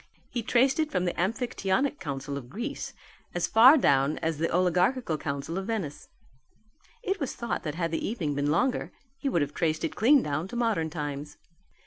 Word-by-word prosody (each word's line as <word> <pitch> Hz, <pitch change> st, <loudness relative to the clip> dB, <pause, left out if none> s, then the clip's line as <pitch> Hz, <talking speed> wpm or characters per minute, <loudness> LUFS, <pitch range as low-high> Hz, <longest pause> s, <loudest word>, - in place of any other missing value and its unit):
He 240 Hz, -, -2 dB
traced 255 Hz, +5 st, +2 dB
it 310 Hz, -1 st, 0 dB
from 180 Hz, -9 st, 0 dB
the 175 Hz, -, 0 dB
Amphictionic 230 Hz, +5 st, 0 dB
Council 140 Hz, -1 st, -4 dB
of 130 Hz, -3 st, -7 dB
Greece 235 Hz, -, -5 dB, 0.4 s
as 175 Hz, -, +1 dB
far 255 Hz, +7 st, +8 dB
down 140 Hz, -, +3 dB
as 160 Hz, -2 st, -2 dB
the 165 Hz, -, +1 dB
Oligarchical 180 Hz, +3 st, +2 dB
Council 145 Hz, +4 st, -3 dB
of 195 Hz, -, -6 dB
Venice; 195 Hz, -11 st, -4 dB, 1.0 s
it 390 Hz, -2 st, -1 dB
was 280 Hz, -, -3 dB
thought 235 Hz, -, -3 dB
that 150 Hz, -2 st, -4 dB
had 165 Hz, -1 st, -1 dB
the 160 Hz, -, -2 dB
evening 175 Hz, -10 st, -2 dB
been 145 Hz, +1 st, 0 dB
longer 180 Hz, -, +1 dB, 0.3 s
he 280 Hz, -, -1 dB
would 170 Hz, -, +2 dB
have 145 Hz, +1 st, -5 dB
traced 160 Hz, -2 st, 0 dB
it -, -, -2 dB
clean 270 Hz, +5 st, +5 dB
down 150 Hz, +4 st, -2 dB
to 240 Hz, -, -8 dB
modern 220 Hz, -9 st, 0 dB
times. 150 Hz, -2 st, -5 dB
175 Hz, 185 wpm, -28 LUFS, 150-240 Hz, 1.0 s, far